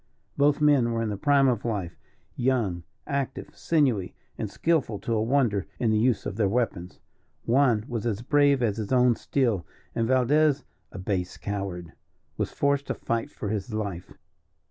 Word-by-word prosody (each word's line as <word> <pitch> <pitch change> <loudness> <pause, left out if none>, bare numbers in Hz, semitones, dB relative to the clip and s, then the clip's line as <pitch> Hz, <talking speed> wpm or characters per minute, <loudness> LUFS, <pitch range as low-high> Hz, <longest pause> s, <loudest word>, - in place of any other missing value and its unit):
Both 145 +1 +3
men 140 -6 +4
were 115 0 0
in 110 - -1
the 105 - -2
prime 140 +5 +3
of 120 -5 +1
life, 100 -7 -3 0.4
young, 120 -9 0 0.2
active, 140 -2 -3
sinewy, 130 - +1 0.2
and - - -4
skilful 160 -10 0
to 115 - -3
a 110 - +1
wonder 115 -5 +1
in 115 -3 +1
the 110 - +2
use 120 +1 +1
of 100 - -4
their 105 -4 +2
weapons. 100 -6 -2 0.5
Juan 120 -4 +3
was 120 -1 -3
as 110 0 -2
brave 140 -1 +3
as 105 -3 0
his 110 0 -4
own 125 -1 +5
steel, 115 -8 0 0.3
and 115 -1 0
Valdez, 140 +3 +3 0.3
a - - -9
base 90 -1 -3
coward, 95 -4 -5 0.4
was - - -2
forced 140 0 0
to - - -2
fight 115 -1 -2
for 105 - -6
his 110 +1 -3
life. 100 -5 -4
115 Hz, 170 wpm, -26 LUFS, 100-135 Hz, 0.5 s, own